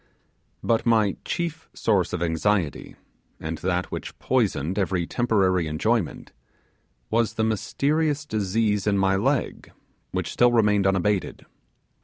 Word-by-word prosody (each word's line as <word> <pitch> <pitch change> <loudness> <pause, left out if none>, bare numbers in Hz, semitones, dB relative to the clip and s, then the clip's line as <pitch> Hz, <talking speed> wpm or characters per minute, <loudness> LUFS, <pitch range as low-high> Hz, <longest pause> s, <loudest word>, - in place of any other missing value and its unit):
But 115 -1 +1
my 110 -4 +3
chief 165 -2 -4
source 100 -5 +1
of 85 -1 -2
anxiety, 85 0 -1 0.4
and 80 0 -5
that 90 0 -1
which - - -6
poisoned 85 +9 0
every 90 -2 0
temporary 95 -7 +1
enjoyment, 95 +6 -1 0.8
was 115 0 +1
the 110 - 0
mysterious 145 +7 0
disease 105 -3 0
in 100 -1 +2
my 95 0 +2
leg, 95 - -1 0.4
which - - -3
still 120 0 +4
remained 105 -4 +3
unabated. 95 0 0
105 Hz, 120 wpm, -24 LUFS, 90-115 Hz, 0.8 s, still